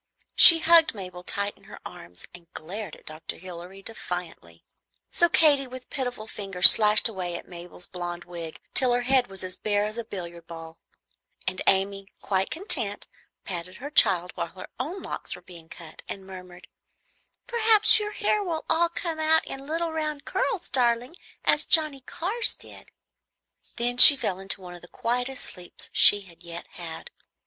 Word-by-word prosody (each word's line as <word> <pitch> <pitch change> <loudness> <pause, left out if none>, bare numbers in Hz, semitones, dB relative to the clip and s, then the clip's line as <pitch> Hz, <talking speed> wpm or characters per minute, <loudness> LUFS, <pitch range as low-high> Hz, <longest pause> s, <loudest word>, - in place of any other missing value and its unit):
She 335 - +10
hugged 330 -5 +4
Mabel 180 -3 -10
tight 200 +3 -3
in - - -25
her - - -13
arms, 85 0 -9
and 175 -1 -16
glared 190 +2 -8
at - - -22
Dr. 155 +1 -9
Hilary 180 +2 -12
defiantly. 175 - -9 0.5
So 345 - +1
Katy 290 -5 +3
with 255 0 -13
pitiful 245 -5 -5
fingers 195 -4 +6
slashed 210 +1 +4
away 185 -5 -6
at - - -9
Mabel's 175 0 -11
blond 175 -1 -7
wig 170 -2 -10
till 255 -2 +10
her 245 0 -1
head 260 0 +1
was 195 -1 -7
as 185 0 -6
bare 205 -1 -2
as 215 +2 -6
a - - -4
billiard 170 -6 -10
ball; 165 -1 -12 0.7
and 185 - -4
Amy, 195 0 0
quite 190 -1 -2
content, 230 - -2 0.4
patted 180 0 -7
her 285 +3 -10
child 180 - +4
while - - -5
her 185 +3 -13
own 330 +10 -6
locks - - -7
were - - -15
being 170 -3 -15
cut, 165 -3 -12
and 195 -1 -7
murmured, 180 -1 -13 0.8
"Perhaps 450 -2 +5
your 420 0 -5
hair 420 -1 0
will 330 -4 -5
all 335 +1 +2
come 335 -2 -6
out 315 +1 +2
in 270 +1 -8
little 330 +2 -3
round 305 -2 -5
curls, 395 -7 -3
darling, 245 +3 0 0.3
as 300 - +2
Johnnie 305 -4 +2
Carr's 400 - -1
did;" - - -16 0.9
then 245 +1 -3
she 285 +2 +10
fell 190 -7 -4
into 195 0 -2
one 180 -1 -11
of 175 - -13
the 175 - -15
quietest 245 +6 -4
sleeps 180 -2 -8
she 205 - +5
had 170 -3 -19
yet 170 -1 -10
had. 485 - -10
205 Hz, 175 wpm, -24 LUFS, 180-285 Hz, 0.9 s, She